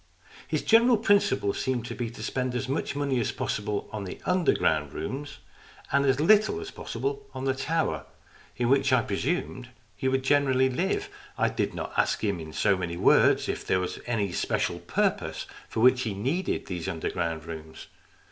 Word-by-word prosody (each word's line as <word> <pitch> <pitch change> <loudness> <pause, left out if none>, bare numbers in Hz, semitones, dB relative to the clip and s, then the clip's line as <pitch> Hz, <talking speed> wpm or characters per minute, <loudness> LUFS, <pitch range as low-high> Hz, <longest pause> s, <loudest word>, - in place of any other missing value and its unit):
His - - -1
general 235 +1 +5
principle 205 - +2
seemed 125 -3 -2
to - - -5
be 120 -2 -3
to 115 - -9
spend 125 -1 -2
as 125 - -2
much 135 +1 -2
money 140 -3 0
as 115 - 0
possible 105 -1 -2
on 105 -2 -4
the 95 - -7
underground 80 - +2
rooms, 135 - -5 0.5
and 140 0 +3
as 135 0 +3
little 215 - +4
as 410 -1 -7
possible 420 0 -4
on 130 - -4
the 135 - +2
tower, 160 +5 -1 0.5
in 120 - +1
which 135 +1 +3
I 130 -3 +4
pre 100 - -2
sumed 130 -8 -2 0.3
he 130 - -2
would 130 0 +1
generally 130 -2 +3
live. 190 - -1 0.3
I - - +2
did - - -2
not - - -5
ask - - +1
him 100 -4 0
in 80 -1 -8
so 95 - +2
many 85 -2 -4
words - - +4
if - - -3
there 95 - +1
was 90 -1 -3
any 105 -5 0
special - - -1
purpose - - -1 0.2
for 110 - -2
which 125 +1 +6
he 110 -5 -2
needed 140 - -1
these 90 -3 -5
underground 80 -1 -2
rooms. 80 -1 -8
130 Hz, 185 wpm, -27 LUFS, 100-145 Hz, 0.5 s, which